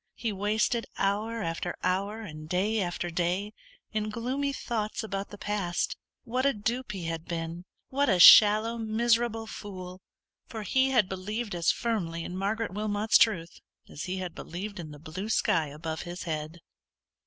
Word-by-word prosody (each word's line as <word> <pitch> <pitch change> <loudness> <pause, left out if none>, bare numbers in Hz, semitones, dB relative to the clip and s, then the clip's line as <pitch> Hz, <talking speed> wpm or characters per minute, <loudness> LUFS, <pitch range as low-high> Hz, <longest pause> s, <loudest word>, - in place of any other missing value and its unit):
He 230 - -2
wasted 215 +4 0
hour 215 +3 0
after 165 -2 -3
hour, 200 +4 0
and 155 -6 -9
day 205 +5 +1
after 175 -1 -2
day, 180 +5 -1 0.4
in 215 -1 -1
gloomy 255 +6 -1
thoughts 225 -5 -3
about 200 -2 -4
the 205 - -10
past. 200 -4 -1 0.3
What 250 +3 -1
a 275 0 +3
dupe 230 +3 -2
he 190 -3 -5
had 165 0 -4
been! 170 +1 -4 0.2
what 280 0 +1
a 185 -3 +3
shallow, 215 +5 +9
miserable 225 0 +1
fool! 185 -4 -8 0.5
for 220 -2 -6
he 265 +5 +2
had 235 -7 +3
believed 205 +4 -4
as 170 -1 +3
firmly 175 -8 -2
in 180 - -6
Margaret 200 +1 -1
Wilmot's 210 +1 +2
truth, 175 -7 +2 0.3
as 145 - -7
he 185 +1 -3
had 180 -2 -4
believed 195 +4 -6
in 160 -3 -6
the 150 - -10
blue 170 +8 -6
sky 165 -7 +2
above 160 +2 -5
his 175 0 -6
head. 160 0 -4
205 Hz, 165 wpm, -29 LUFS, 175-225 Hz, 0.5 s, shallow